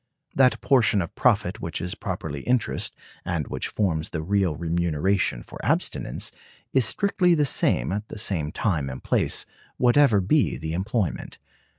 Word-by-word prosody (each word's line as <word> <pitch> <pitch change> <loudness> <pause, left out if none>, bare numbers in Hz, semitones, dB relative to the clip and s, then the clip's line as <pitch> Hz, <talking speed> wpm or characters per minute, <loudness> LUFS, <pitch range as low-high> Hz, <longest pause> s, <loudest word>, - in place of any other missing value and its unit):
That 125 -4 +4
portion 120 -6 +3
of 85 - -9
profit 105 -4 +1
which 85 -1 -4
is 90 0 -3
properly 70 -3 -5
interest, 125 -2 0 0.3
and 85 -5 -2
which - - -3
forms 85 -7 -1
the 80 -2 -4
real 95 -2 +1
remuneration 85 -3 0
for - - -11
abstinence, - - -1 0.4
is 130 -3 +4
strictly 180 - +2
the 150 -2 +2
same 65 - +1
at 105 +2 -3
the - - -8
same 85 -8 -2
time 80 -11 -1
and 65 - -8
place, - - 0 0.3
whatever 125 -3 +5
be 120 +11 +2
the 80 +4 -4
employment. 95 0 -2
95 Hz, 155 wpm, -25 LUFS, 80-120 Hz, 0.4 s, whatever